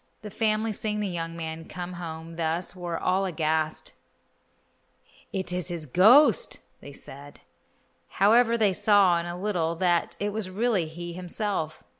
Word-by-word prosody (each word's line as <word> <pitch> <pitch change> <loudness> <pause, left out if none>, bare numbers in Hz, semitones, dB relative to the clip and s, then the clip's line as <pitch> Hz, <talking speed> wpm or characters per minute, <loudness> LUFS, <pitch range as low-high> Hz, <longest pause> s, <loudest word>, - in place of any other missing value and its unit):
The 210 - -7
family, 215 +1 0
seeing 210 +1 -3
the 210 - -1
young 165 -2 -4
man 160 0 -5
come 180 0 -7
home 165 -1 -7
thus, 165 +3 -2
were 175 -2 -4
all 185 +3 +1
aghast. 160 -2 -1 1.4
"It 190 -3 -3
is 180 -2 -2
his 170 -3 -4
ghost," 235 - +5 0.3
said 140 +1 -11
they. - - -19 0.7
However, 230 +4 +4
they 210 -4 +3
saw 195 -3 +4
in 170 - -5
a 175 +1 -5
little 175 -5 -1
that 175 0 +1
it 205 - -1
was 215 -3 -3
really 200 -3 0
he 175 +2 -7
himself. 180 -2 -3
180 Hz, 150 wpm, -26 LUFS, 165-205 Hz, 1.4 s, ghost